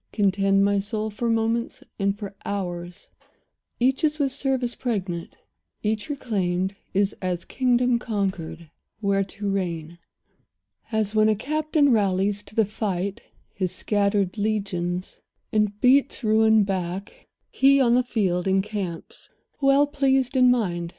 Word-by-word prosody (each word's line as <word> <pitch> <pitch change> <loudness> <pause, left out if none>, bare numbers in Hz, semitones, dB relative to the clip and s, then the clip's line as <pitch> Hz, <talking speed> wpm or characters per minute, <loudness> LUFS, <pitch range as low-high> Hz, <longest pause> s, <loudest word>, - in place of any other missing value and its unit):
Contend, 195 -1 +2
my 200 0 +2
soul, 215 +1 -3
for 235 +3 -2
moments 230 +1 -1 0.2
and 200 0 0
for 200 -2 -7
hours; 180 -1 -5 0.7
Each 265 +5 +2
is 305 -1 +2
with 280 -3 0
service 260 -3 -1
pregnant; 190 -9 -4 0.5
each 215 +4 -1
reclaimed 195 -8 -1 0.2
Is 200 +1 +1
as 180 -2 -2
a - - -17
kingdom 245 -1 +2
conquered, 180 -8 -3 0.3
where 200 -2 +1
to 200 +1 -6
reign. 170 -4 -3 0.9
As 220 -2 0
when 215 0 +4
a 215 - +3
captain 305 - +1
rallies 200 -2 +1
to 205 - -11
the 220 - +4
fight 200 -2 -3 0.3
His 185 -2 -2
scattered 200 -1 0
legions, 185 -4 -2 0.3
and 210 -1 +1
beats 265 +2 +3
ruin 220 0 +4
back, 190 +1 -4 0.2
He, 275 +1 +5
on 240 -3 +4
the 250 - +5
field, 195 -7 -1
encamps, 190 -3 -3 0.3
well 275 +1 +5
pleased 270 -2 +1
in 255 -1 +6
mind. 175 -9 0
205 Hz, 135 wpm, -24 LUFS, 190-240 Hz, 0.9 s, in